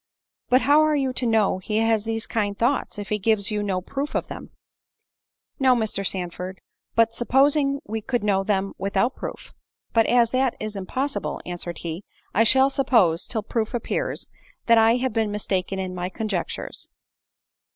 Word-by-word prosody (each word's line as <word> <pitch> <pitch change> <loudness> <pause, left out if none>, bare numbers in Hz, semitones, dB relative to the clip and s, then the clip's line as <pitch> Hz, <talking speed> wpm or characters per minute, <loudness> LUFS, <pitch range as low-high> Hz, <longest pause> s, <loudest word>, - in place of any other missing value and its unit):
"But 255 +2 +5
how 290 +2 +5
are 310 -1 +3
you 270 -3 0
to 250 -1 -1
know 220 -4 +2
he 210 +3 -2
has 225 -1 +2
these 225 0 -2
kind 205 -3 -1
thoughts, 250 0 0
if 205 -1 -6
he 210 - 0
gives 215 0 +2
you 210 -1 -1
no 190 -3 -1
proof 280 +9 -4
of - - -1
them?" - - -8 1.1
"No, 260 -2 +5
Mr. 220 -4 -1
Sandford; 185 0 -4 0.4
but 230 0 +3
supposing 275 +3 +2
we 220 +1 -4
could 245 0 -2
know 195 -2 +2
them 195 -1 0
without 200 +6 0
proof." - - -8 0.4
"But 225 -1 +4
as 240 -1 +4
that 260 -1 +1
is 215 -1 -5
impossible," 260 +9 -3
answered 175 -1 -5
he, 170 +3 -5 0.3
"I 225 - +4
shall 265 +4 +4
suppose, 220 -12 +2
till 220 -3 -2
proof 225 +2 -2
appears, - - -2 0.4
that 230 -1 +6
I 225 +1 +5
have 255 -1 -1
been 220 -1 +1
mistaken 195 -2 -2
in 185 -1 -3
my 180 0 -3
conjectures." 200 -3 -4
220 Hz, 170 wpm, -24 LUFS, 195-250 Hz, 1.1 s, that